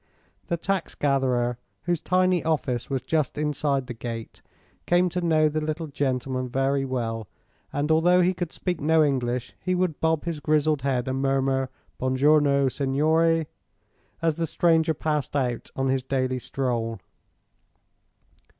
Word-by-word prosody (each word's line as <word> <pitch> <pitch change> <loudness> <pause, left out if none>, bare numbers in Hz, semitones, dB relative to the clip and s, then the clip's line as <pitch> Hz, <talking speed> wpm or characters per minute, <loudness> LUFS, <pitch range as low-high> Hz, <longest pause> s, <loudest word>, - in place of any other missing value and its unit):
The 170 - -1
tax 190 +1 -2
gatherer 125 -4 +1 0.2
whose 175 -1 -1
tiny 185 0 +2
office 140 -7 -1
was 135 -2 -2
just 150 -1 0
inside 145 -2 0
the 125 - -6
gate 115 0 -7 0.5
came 175 +1 +3
to 180 +1 -2
know 160 -2 +3
the 155 +1 -1
little 155 +2 -3
gentleman 130 -3 -2
very 135 +2 +1
well, 115 -4 -3 0.4
and 145 +2 -1
although 175 +3 +5
he 180 +1 +3
could 175 -2 -4
speak 180 -4 -3
no 160 +2 +4
English 125 -4 -1
he 185 0 -1
would 180 -4 0
bob 160 -1 +1
his 165 -3 -3
grizzled 150 -1 +1
head 130 -2 0
and 130 0 -1
murmur: 135 -1 +1 0.3
"Buon 130 0 0
giorno, 140 0 +4
signore!" 155 +5 +2 0.8
as 165 -1 +1
the 165 -1 -1
stranger 160 -1 +2
passed 150 -2 -2
out 125 -4 -1
on 135 0 0
his 130 0 +1
daily 130 -1 -1
stroll. 120 -4 -2
145 Hz, 150 wpm, -25 LUFS, 130-160 Hz, 0.8 s, although